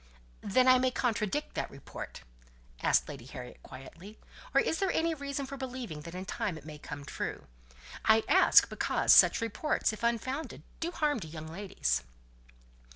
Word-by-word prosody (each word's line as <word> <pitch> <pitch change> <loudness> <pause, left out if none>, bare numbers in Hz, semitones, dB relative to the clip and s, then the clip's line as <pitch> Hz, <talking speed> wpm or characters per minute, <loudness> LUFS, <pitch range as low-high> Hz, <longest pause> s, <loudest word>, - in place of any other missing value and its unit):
"Then 255 +6 +3
I 255 0 +7
may 255 0 +3
contradict 245 +2 -1
that - - -3
report?" 140 - -9 0.6
asked - - +3
Lady 135 -5 -8
Harriet 125 -2 -9
quickly. 170 +10 -12 0.3
"Or - - +4
is 320 - 0
there 390 - +1
any 330 +1 +1
reason 280 -2 -4
for 275 +1 -7
believing 250 - -6
that 170 +3 -9
in 185 +1 -5
time 185 -3 -3
it 150 - -12
may 150 -1 -9
come 145 -1 -8
true? - - -5 0.6
I 220 0 +5
ask - - +6
because - - +2
such - - +7
reports, 230 +2 0
if 215 - -8
unfounded, 235 +6 -2 0.2
do 330 - -1
harm 300 -6 0
to 165 - -7
young 155 0 -8
ladies." 165 - -1
220 Hz, 165 wpm, -31 LUFS, 160-265 Hz, 0.6 s, I